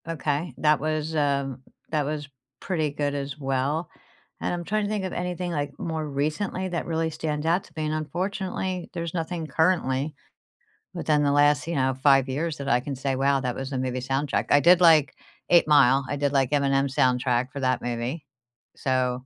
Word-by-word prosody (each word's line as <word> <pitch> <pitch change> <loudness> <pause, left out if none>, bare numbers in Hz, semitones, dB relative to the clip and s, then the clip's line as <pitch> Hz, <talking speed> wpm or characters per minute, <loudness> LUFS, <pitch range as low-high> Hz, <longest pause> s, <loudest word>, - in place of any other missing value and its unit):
Okay, 155 0 -2
that 150 -1 +3
was, 155 +1 -2
um, 140 -3 0 0.3
that 150 -2 +1
was 150 0 -4 0.3
pretty 160 -5 -1
good 145 0 -2
as 140 0 -4
well, 140 +4 -1 0.5
and - - -2
I'm 175 -1 -3
trying 215 +4 -1
to - - -3
think 210 -3 -2
of 185 - -4
anything 180 0 -3
like 145 -3 -3
more 160 -2 -3
recently 155 +7 -2
that 175 -1 -3
really 160 -1 -1
stands 150 -1 -3
out 175 +4 +2
to - - -20
me 155 - -1
and 155 - -1
unfortunately, 185 +3 -3
there's 170 -2 -4
nothing 165 -1 -3
currently 155 -4 +1 0.8
within 150 -1 +1
the 145 - +2
last, 145 +1 +3
you 170 - -2
know, 130 -1 +1
5 135 -1 +5
years 150 +4 -2
that 140 -1 -4
I 125 - +4
can 135 +2 -5
say, 135 +1 -2
"Wow, 135 0 +2
that 125 -1 -1
was 135 0 -5
the 135 - -2
movie 130 0 -2
soundtrack." 135 +3 -1
I 145 - +5
did, 175 +2 +6
like, 160 -5 +6 0.4
8 170 -2 +5
Mile. 135 -2 +5
I - - -1
did, 145 0 0
like, 135 -2 +1
Eminem's 140 -1 +1
soundtrack 125 0 +2
for 140 - -6
that 130 -1 0
movie. 120 +6 -3 0.5
So, 130 -1 0
145 Hz, 195 wpm, -25 LUFS, 135-165 Hz, 0.8 s, did